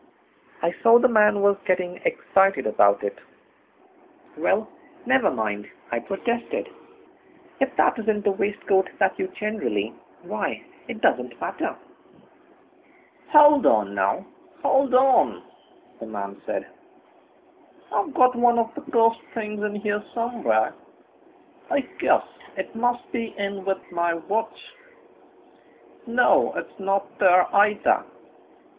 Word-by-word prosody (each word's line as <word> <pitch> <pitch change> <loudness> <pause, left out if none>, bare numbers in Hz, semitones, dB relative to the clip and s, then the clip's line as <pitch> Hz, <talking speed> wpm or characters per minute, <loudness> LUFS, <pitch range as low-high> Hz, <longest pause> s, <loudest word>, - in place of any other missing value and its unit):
I 170 +1 +1
saw 230 +1 +7
that 240 - 0
the 245 - -4
man 210 -1 +4
was 200 0 +3
getting 180 -1 -1
excited 195 - +2
about 100 -1 +3
it. 100 - -4 1.2
"Well, - - 0 0.4
never - - +3
mind," 105 -2 -3 0.2
I 120 - 0
protested; 235 - -3 0.9
"if 270 0 -1
that - - +2
isn't 215 -2 -1
the 205 - +2
waistcoat 195 -1 0
that - - +1
you 375 - -1
generally 215 - -3 0.3
why, - - -4 0.2
it - - -7
doesn't - - 0
matter." - - -4 1.5
"Hold 295 -2 +7
on, 105 -2 +2
now, 95 -1 0 0.4
hold 270 -1 +2
on!" 260 +1 +3 0.6
the 115 - -8
man 100 -2 -7
said, - - -3 1.3
"I've 335 - -1
got 255 0 +4
one 240 0 +3
of 230 0 0
the - - -8
cursed 230 -1 +3
things 210 -2 -4
in 210 0 -2
here 210 0 -2
somewhere. 235 0 0 1.0
I 285 - +1 0.2
guess - - +3 0.3
it - - -5
must 245 +1 -2
be 230 -2 -4
in 200 -1 -4
with 195 -2 -3
my 170 -1 0
watch. 205 - -4 1.3
No, 240 +2 +3
it's - - -7
not 195 0 -2
there 180 -2 +5
either. 205 +1 +3
210 Hz, 125 wpm, -24 LUFS, 185-240 Hz, 1.5 s, saw